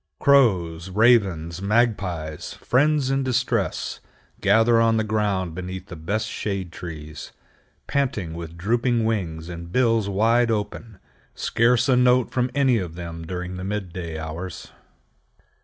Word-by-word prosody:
Crows, 95 -11 +3
ravens, 95 -6 +2
magpies—friends 110 - 0
in 135 0 +1
distress—gather 115 -2 0
on 115 0 +3
the 110 - +1
ground 100 -5 -1
beneath 90 +1 -6
the 90 - -7
best 100 +8 -2
shade 100 -5 -4
trees, 80 -3 -8 0.5
panting 110 -12 -1
with 85 0 -8
drooping 115 +5 +1
wings 85 -8 -2
and 85 -1 -8
bills 115 -3 +2
wide 115 +4 +3
open, 105 -1 -3 0.4
scarce 120 +2 +2
a 130 - +4
note 125 0 +3
from 125 0 0
any 130 -4 +3
of 85 -4 -5
them 85 -1 -7
during 90 +1 -5
the 90 - -6
midday 90 -5 -4
hours. 80 +3 -7
100 Hz, 125 wpm, -23 LUFS, 85-120 Hz, 0.5 s, a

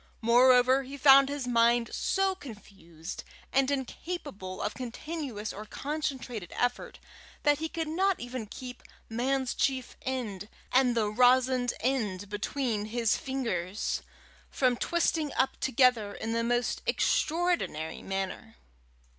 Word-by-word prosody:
Moreover, 250 +3 +5
he 270 +1 -8
found 275 0 +7
his 285 -2 -3
mind 235 0 +3
so 385 0 +1
confused 195 - -10 0.3
and 270 0 +3
incapable 260 - -5
of 210 - -2
continuous 255 -3 -5
or 210 - -7
concentrated 260 - -4
effort, 245 0 -1 0.5
that 290 -1 +3
he 320 0 -3
could 325 -1 -3
not 375 +4 +1
even 245 -2 -5
keep 250 +3 -9 0.3
"man's 255 +3 0
chief 260 -2 -1
end" 220 -7 -4 0.2
and 250 -2 +3
the 210 -2 +1
rosined 250 +1 +4
end 210 -7 -1
between 210 +1 -2
his 230 0 +1
fingers 220 -8 -2 0.5
from 255 -2 +2
twisting 320 +1 0
up 265 - 0
together 250 -5 +2
in 225 - -4
the 230 0 0
most 240 +1 0
extraordinary 325 - 0
manner. 195 +4 -4
250 Hz, 120 wpm, -29 LUFS, 220-275 Hz, 0.5 s, found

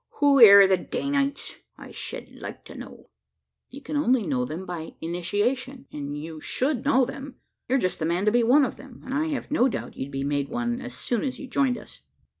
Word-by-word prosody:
Who 280 -2 +5
air 200 -3 +10
the 190 -1 +3
Danites, 280 +8 -2 0.2
I - - -11
shed - - -7
like - - -8
to - - -11
know?" - - -11 0.6
"You 275 - -11
can 300 - -5
only 260 -6 +2
know 130 -6 0
them 160 +8 -6
by 170 -3 -7
initiation; 230 +11 -2
and 145 0 -5
you 155 +1 -8
should 260 -1 -1
know 265 -2 +3
them. 270 +1 -8 0.3
You're 260 - +2
just 185 -8 -1
the 160 - -1
man 175 +4 0
to 210 - +4
be 240 +2 +3
one 265 +5 +5
of - - -6
them; 270 -3 -14
and 265 - -5
I 300 +3 +1
have 290 -3 -4
no 270 -4 +3
doubt - - -6
you'd 135 - -5
be 135 -1 -4
made 140 0 -1
one, 240 +1 -2
as - - -6
soon 240 -3 -1
as 260 -2 -3
you 275 - -8
joined 260 -1 +1
us." 210 - -13
240 Hz, 220 wpm, -25 LUFS, 175-270 Hz, 0.6 s, air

